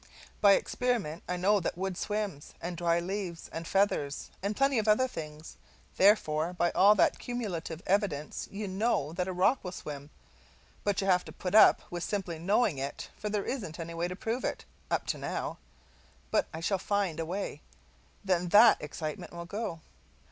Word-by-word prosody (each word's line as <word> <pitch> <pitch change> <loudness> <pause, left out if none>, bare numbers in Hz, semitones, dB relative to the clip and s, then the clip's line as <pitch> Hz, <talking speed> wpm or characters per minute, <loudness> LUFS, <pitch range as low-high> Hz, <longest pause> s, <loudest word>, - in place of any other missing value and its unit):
By 200 -1 +8
experiment 210 -8 0
I 180 - -1
know 200 +3 +3
that 170 - -3
wood 190 0 -2
swims, 205 -6 -3
and 175 +1 -4
dry 170 0 +2
leaves, 180 -1 -4
and 165 +1 -5
feathers, 170 -8 0
and 200 +2 -1
plenty 275 -1 +3
of 220 - -2
other 215 +5 +4
things; 155 -7 -8 0.4
therefore 175 -5 +3
by 175 -1 +1
all 205 +2 +6
that - - +3
cumulative 185 -10 -4
evidence 180 -7 -1
you 205 +1 -5
know 190 -6 0
that 180 +1 -2
a - - -2
rock 185 +9 +2
will 180 - -4
swim; 145 -5 -7 0.7
but 205 -2 +1
you - - -2
have 180 -1 +4
to - - -9
put 180 - -5
up 215 - +7
with 175 -1 -3
simply 185 -5 -3
knowing 195 - +2
it, 140 +1 -5
for 210 - -4
there 205 -1 -1
isn't 195 - -4
any 165 0 -5
way 170 +1 -1
to 180 - -5
prove 225 +6 -3
it - - -3 0.2
up - - 0
to - - -2
now. - - -4 0.7
But - - +2
I 160 - -6
shall 190 +3 0
find 195 -5 -1
a 165 - -1
way 195 +4 -4 0.6
then 180 -2 +1
THAT 215 +4 +7
excitement 155 +2 -5
will 170 0 -6
go. 200 -3 -4
185 Hz, 185 wpm, -30 LUFS, 165-205 Hz, 0.7 s, By